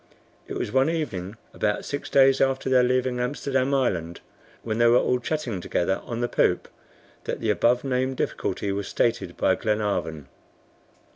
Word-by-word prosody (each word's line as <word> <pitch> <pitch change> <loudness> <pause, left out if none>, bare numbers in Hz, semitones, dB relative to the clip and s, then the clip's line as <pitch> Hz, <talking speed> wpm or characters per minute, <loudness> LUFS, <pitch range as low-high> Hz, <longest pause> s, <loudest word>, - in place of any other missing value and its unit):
It - - -5
was - - -3
one 135 +3 +3
evening, 105 - -3 0.2
about 105 0 -1
six 145 - -4
days 135 -1 +5
after 135 0 +1
their 130 -1 +6
leaving 125 0 +1
Amsterdam 135 +1 -1
Island, 85 -10 -1 0.4
when 110 0 -2
they 120 - +5
were 120 +1 +6
all 125 0 +2
chatting 125 - -3
together 90 +2 -1
on 120 0 -4
the 120 - +1
poop, - - +1 0.6
that - - -3
the 110 -2 +1
above 120 +5 +2
named 130 -1 -1
difficulty 100 - -2
was 100 -1 -3
stated 95 -7 -1
by - - +3
Glenarvan. 100 - -2
120 Hz, 160 wpm, -25 LUFS, 100-130 Hz, 0.6 s, their